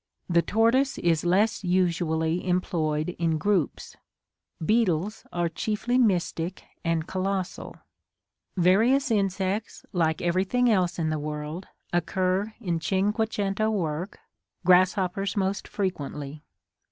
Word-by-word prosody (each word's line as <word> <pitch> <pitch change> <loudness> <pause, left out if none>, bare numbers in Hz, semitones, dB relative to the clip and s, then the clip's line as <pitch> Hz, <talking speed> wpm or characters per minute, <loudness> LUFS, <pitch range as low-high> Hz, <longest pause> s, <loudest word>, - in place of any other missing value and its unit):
The 170 -1 +3
tortoise 230 +8 +2
is 165 -2 +1
less 200 +5 +2
usually 170 -2 0
employed 160 -4 0
in 165 -2 +1
groups. 190 0 -1 0.7
Beetles 210 -2 +1
are 175 -1 0
chiefly 215 +8 -1
mystic 180 -5 0 0.2
and 165 -1 0
colossal. 190 0 -3 0.8
Various 230 +10 +4
insects, 195 0 -1
like 160 -3 +1
everything 190 +8 +2
else 185 -4 +1
in 160 -2 0
the 155 - -1
world, 150 +4 -5 0.3
occur 185 +4 0
in 175 -7 -2
cinque 205 +6 0
cento 205 +2 0
work; 175 -3 -2 0.5
grasshoppers 185 +2 +3
most 195 0 -1
frequently. 150 -6 -4
185 Hz, 105 wpm, -26 LUFS, 165-205 Hz, 0.8 s, Various